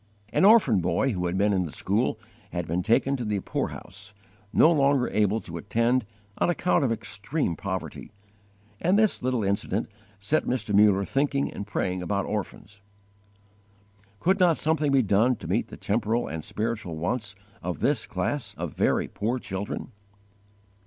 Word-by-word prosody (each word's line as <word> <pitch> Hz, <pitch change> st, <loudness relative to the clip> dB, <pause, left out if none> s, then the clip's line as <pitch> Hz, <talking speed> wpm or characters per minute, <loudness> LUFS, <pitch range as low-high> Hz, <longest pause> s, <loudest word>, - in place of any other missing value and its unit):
_ -, -, -35 dB, 0.3 s
An 185 Hz, -, +3 dB
orphan 200 Hz, -, +6 dB
boy 90 Hz, +10 st, +1 dB
who 90 Hz, -2 st, -1 dB
had 90 Hz, +2 st, -2 dB
been 100 Hz, +1 st, +3 dB
in 90 Hz, -3 st, 0 dB
the -, -, -9 dB
school 105 Hz, -, 0 dB, 0.3 s
had 85 Hz, -1 st, -3 dB
been 85 Hz, +3 st, 0 dB
taken 115 Hz, +6 st, +2 dB
to 125 Hz, -, -4 dB
the 105 Hz, -2 st, -1 dB
poorhouse, 100 Hz, +2 st, -6 dB, 0.4 s
no 160 Hz, -, +6 dB
longer 140 Hz, -4 st, +3 dB
able 105 Hz, +1 st, +1 dB
to 85 Hz, -1 st, -8 dB
attend 115 Hz, +5 st, +1 dB, 0.3 s
on -, -, +2 dB
account 175 Hz, -2 st, +2 dB
of 130 Hz, -, +1 dB
extreme 110 Hz, -, -2 dB
poverty; 95 Hz, 0 st, -5 dB, 0.7 s
and 185 Hz, +4 st, +2 dB
this 215 Hz, -1 st, +2 dB
little 125 Hz, -3 st, 0 dB
incident 100 Hz, +1 st, -1 dB, 0.3 s
set 105 Hz, +10 st, 0 dB
Mr. 115 Hz, -4 st, -2 dB
Muller 100 Hz, -1 st, +5 dB
thinking 140 Hz, +2 st, 0 dB
and 100 Hz, -, -6 dB
praying 90 Hz, 0 st, -2 dB
about 100 Hz, +2 st, -1 dB
orphans. 105 Hz, 0 st, -5 dB, 1.4 s
Could 190 Hz, +3 st, +2 dB
not 175 Hz, -3 st, +4 dB
something 155 Hz, -2 st, +1 dB
be 135 Hz, -2 st, +4 dB
done 110 Hz, +5 st, +3 dB
to -, -, -9 dB
meet -, -, 0 dB
the -, -, -10 dB
temporal 115 Hz, +3 st, 0 dB
and 80 Hz, -1 st, -5 dB
spiritual 110 Hz, -7 st, -3 dB
wants 105 Hz, +4 st, -3 dB, 0.3 s
of 90 Hz, 0 st, -3 dB
this 135 Hz, -6 st, +1 dB
class 100 Hz, +9 st, -2 dB
of -, -, -5 dB
very -, -, +1 dB
poor 115 Hz, +5 st, -2 dB
children? 105 Hz, 0 st, -5 dB
110 Hz, 165 wpm, -26 LUFS, 100-130 Hz, 1.4 s, orphan